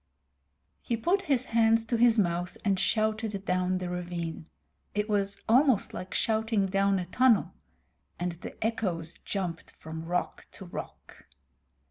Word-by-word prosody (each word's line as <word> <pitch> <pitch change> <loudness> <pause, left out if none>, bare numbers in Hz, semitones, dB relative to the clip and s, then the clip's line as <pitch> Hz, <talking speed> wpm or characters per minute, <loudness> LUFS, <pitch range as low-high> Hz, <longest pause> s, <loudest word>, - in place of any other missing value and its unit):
He 235 - -1
put 355 - +2
his 275 -9 +1
hands 225 0 +3
to 235 - 0
his 235 0 +5
mouth 175 -2 0
and 195 -2 +2
shouted 215 -2 0
down 185 0 +1
the 180 -1 -3
ravine 175 -2 -4 0.5
it 210 0 0
was 200 -2 0
almost 255 -1 +4
like 185 - -6
shouting 220 -2 +1
down 195 +1 +2
a 180 - -2
tunnel 235 +4 +3 0.7
and 175 0 -1
the 170 +1 -9
echoes 180 -8 -2
jumped 180 -5 -4
from 160 +1 -7
rock 175 +1 -2
to 190 - -10
rock. 175 - -9
200 Hz, 140 wpm, -29 LUFS, 180-225 Hz, 0.7 s, his